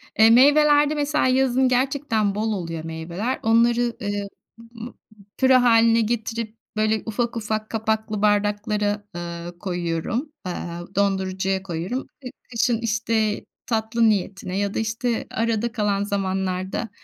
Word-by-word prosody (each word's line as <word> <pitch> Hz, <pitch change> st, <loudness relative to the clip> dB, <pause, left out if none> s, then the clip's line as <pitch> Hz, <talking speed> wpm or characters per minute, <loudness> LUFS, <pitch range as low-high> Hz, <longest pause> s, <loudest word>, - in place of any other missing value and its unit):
E, 220 Hz, +1 st, +6 dB
meyvelerde 290 Hz, +4 st, +5 dB
mesela 295 Hz, -1 st, +1 dB
yazın 260 Hz, 0 st, +3 dB
gerçekten 250 Hz, -5 st, +1 dB
bol 220 Hz, +1 st, -1 dB
oluyor 165 Hz, -4 st, -4 dB
meyveler. 170 Hz, +9 st, -4 dB
Onları, 235 Hz, +1 st, +3 dB
eee, 205 Hz, 0 st, -2 dB, 0.3 s
ımm, 230 Hz, +1 st, -10 dB, 0.4 s
püre 260 Hz, -1 st, +5 dB
hâline 230 Hz, -1 st, +5 dB
getirip 225 Hz, 0 st, -3 dB, 0.2 s
böyle 215 Hz, 0 st, +1 dB
ufak 235 Hz, +1 st, -2 dB
ufak 215 Hz, 0 st, -3 dB
kapaklı 220 Hz, -1 st, -1 dB
bardaklara, 205 Hz, 0 st, +1 dB
eee, 170 Hz, 0 st, -6 dB
koyuyorum. 180 Hz, -, -3 dB
Aaa, 175 Hz, +1 st, -6 dB
dondurucuya 190 Hz, -1 st, 0 dB
koyuyorum. 185 Hz, +8 st, -4 dB
E, 255 Hz, -, -7 dB, 0.2 s
kışın, 235 Hz, 0 st, +1 dB
işte, 220 Hz, -1 st, 0 dB, 0.2 s
tatlı 225 Hz, 0 st, +1 dB
niyetine 195 Hz, -2 st, -2 dB
ya 200 Hz, 0 st, -1 dB
da, -, -, -1 dB
işte, 225 Hz, +2 st, -2 dB
arada 230 Hz, 0 st, 0 dB
kalan 205 Hz, -3 st, 0 dB
zamanlarda 190 Hz, +1 st, -2 dB
220 Hz, 125 wpm, -23 LUFS, 195-235 Hz, 0.4 s, E